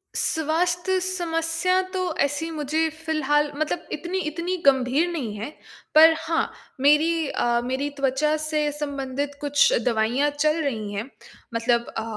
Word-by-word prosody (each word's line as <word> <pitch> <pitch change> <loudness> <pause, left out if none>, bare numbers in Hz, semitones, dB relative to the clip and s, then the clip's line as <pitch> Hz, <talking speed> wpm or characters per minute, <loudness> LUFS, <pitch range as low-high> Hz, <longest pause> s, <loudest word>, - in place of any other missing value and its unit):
स्वास्थ्य 350 +4 0
समस्या 350 0 0
तो 375 - -1 0.2
ऐसी 290 +4 0
मुझे 315 +1 0 0.2
फ़िलहाल 295 -2 +1
मतलब 310 +3 -2
इतनी 350 +5 -3
इतनी 340 +4 -3
गंभीर 270 +4 +3
नहीं 260 -11 -3
है 215 +6 -5 0.5
पर 320 +1 +9
हाँ 330 0 -1 0.3
मेरी 310 +3 +3
अ, 240 -2 0
मेरी 260 +3 -1
त्वचा 275 +3 +1
से 305 -1 0
संबंधित 285 -1 -4
कुछ 285 -1 +3
दवाइयाँ 240 +5 +1
चल 305 +2 +2
रही 220 -7 -3
हैं 210 +6 -4 0.4
मतलब 235 +1 +1
अ, 225 - -1
295 Hz, 135 wpm, -24 LUFS, 265-325 Hz, 0.5 s, पर